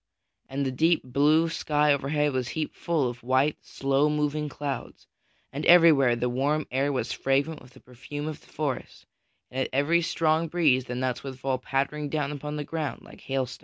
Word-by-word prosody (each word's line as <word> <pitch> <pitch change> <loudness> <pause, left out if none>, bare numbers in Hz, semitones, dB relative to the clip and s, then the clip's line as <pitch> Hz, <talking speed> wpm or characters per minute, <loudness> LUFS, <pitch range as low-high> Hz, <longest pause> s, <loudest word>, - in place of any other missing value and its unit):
And 140 +1 -2
the 130 - -1
deep 160 +6 +2
blue 145 +6 +3
sky 150 -2 +2
overhead 145 +1 0
was 130 -2 -1
heaped 155 +2 -4
full 160 -6 0
of 120 0 -6
white, 130 +4 +1
slow 135 +2 +1
moving 150 0 -1
clouds, 140 -3 -6 0.5
and 145 +3 -4
everywhere 155 -8 +7
the 120 +1 -1
warm 140 +5 0
air 135 +3 +1
was 130 - -2
fragrant 140 +3 0
with 125 - -17
the 130 - -17
perfume 145 +4 -7
of 155 - -6
the - - -21
forest, 140 -5 -4 0.5
and 130 - -4
at - - -1
every 145 +6 +2
strong 160 0 +1
breeze 150 -7 +2
the 125 - -5
nuts 125 0 -2
would 135 -2 -7
fall 130 -1 -1
pattering 140 +3 -2
down 150 -1 -1
upon 150 +1 -5
the 150 - -3
ground 155 -1 -4
like - - -15
hailstones. 135 -2 -3
145 Hz, 190 wpm, -27 LUFS, 130-150 Hz, 0.5 s, everywhere